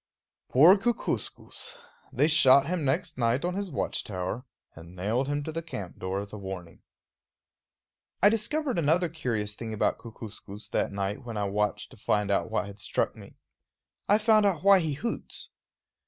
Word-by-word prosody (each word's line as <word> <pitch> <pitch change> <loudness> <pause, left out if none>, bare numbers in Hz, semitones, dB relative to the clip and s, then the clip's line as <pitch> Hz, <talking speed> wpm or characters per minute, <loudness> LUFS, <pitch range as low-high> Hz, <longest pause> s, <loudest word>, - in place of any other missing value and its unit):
Poor 160 +9 +8
Kookooskoos! 240 - -2 0.3
they 135 +3 +3
shot 140 -4 +6
him 170 0 -1
next 145 +2 -1
night 120 +6 +2
on 180 - -1
his 200 0 -3
watch - - -2
tower, 95 +5 -4 0.3
and 85 +2 -13
nailed 110 +9 0
him 145 0 -1
to 160 - -4
the 165 +1 -3
camp 105 - -7
door 95 +1 -2
as 100 +1 -7
a 105 - -6
warning. 95 -3 -8 1.4
I 205 - +9
discovered 245 - 0
another 165 +3 +2
curious 115 -10 -2
thing 110 0 -6
about 105 - +1
Kookooskoos 110 -2 -9
that - - 0
night 100 +5 -3
when 115 -3 -6
I 105 - 0
watched 105 +1 -1
to - - -14
find 105 -1 0
out 100 - +1
what 90 - 0
had 100 0 -10
struck - - -1
me. - - -13 0.7
I 205 - +6
found 215 0 +4
out 185 -5 +1
why 200 -1 +7
he 160 -4 -1
hoots. 230 +12 -5
130 Hz, 170 wpm, -28 LUFS, -, 1.4 s, I